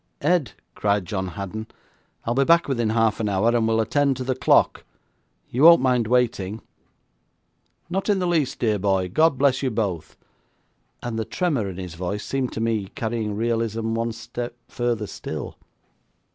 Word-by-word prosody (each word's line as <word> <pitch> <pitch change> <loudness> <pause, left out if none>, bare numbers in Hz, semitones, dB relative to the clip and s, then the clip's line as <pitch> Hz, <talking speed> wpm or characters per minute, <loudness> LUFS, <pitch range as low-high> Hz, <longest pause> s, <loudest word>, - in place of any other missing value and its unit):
'Ed,' 155 -5 +2 0.2
cried 100 -2 0
John 95 0 -3
Haddon, 100 +4 -6 0.6
I'll 115 - 0
be 135 +3 +3
back 170 +4 +4
within 120 -5 0
half 110 -1 +2
an 110 -2 0
hour, 100 +3 +2
and 115 -2 +2
we'll 115 0 +2
attend 135 +4 +1
to 130 - -3
the 130 +1 0
clock. 130 - +3 0.7
You 125 - -1
won't 170 +2 +9
mind 125 -3 +2
waiting?' 110 -4 0 1.3
'Not 190 +4 -2
in 205 - +3
the 185 - -1
least, 165 -6 +1
dear 110 -3 +1
boy. 95 -2 +1
God 155 - +3
bless 135 -1 +2
you 135 - +1
both,' 100 -8 -3 0.9
and 120 -2 -3
the - - 0
tremor 140 - -1
in 90 - -8
his 90 -3 -6
voice 90 +4 -4
seemed 135 -2 -2
to - - -4
me 110 -3 0
carrying 110 -2 -2
realism 115 0 -1
one 115 +1 -1
step 120 +1 -6
further 120 -3 -1
still. - - -6
115 Hz, 170 wpm, -23 LUFS, 105-130 Hz, 1.3 s, won't